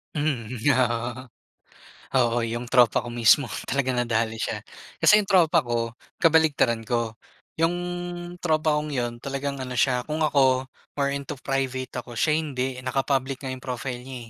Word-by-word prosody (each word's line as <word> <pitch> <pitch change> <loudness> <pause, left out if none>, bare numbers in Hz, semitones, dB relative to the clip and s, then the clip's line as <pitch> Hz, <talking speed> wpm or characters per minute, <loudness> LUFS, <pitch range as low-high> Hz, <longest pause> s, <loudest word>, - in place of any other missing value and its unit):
Mhm, 130 -6 -2 0.2
oo. 120 0 0 1.0
Oo, 120 -1 +2
yung 120 +1 -3
tropa 120 -3 +4
ko 120 - -7
mismo 120 +3 +4 0.2
talagang 130 -1 0
nadali 115 -2 0
siya. - - -3 0.4
Kasi 210 0 +6
yung 195 - -11
tropa 170 -4 +4
ko, 115 -1 -2 0.2
kabaliktaran 155 -8 +3
ko. 115 -1 -1 0.4
Yung 165 +1 +2 0.7
tropa 155 -2 +2
kong 150 0 -5
yun, 120 -1 -1
talagang 140 0 -3
ano 125 -1 -6
siya, 125 -3 +2
kung 155 +1 -2
ako, 130 -3 +3 0.4
more 140 0 +1
into 140 +1 -5
private 130 -2 -2
ako, 120 -1 -11
siya 155 -1 +3
hindi. 135 -4 -3
Naka-public 135 +1 0
nga 130 -2 -5
yung 130 - -6
profile 125 -1 -4
niya, 130 -1 -7
130 Hz, 150 wpm, -25 LUFS, 120-140 Hz, 1.0 s, Kasi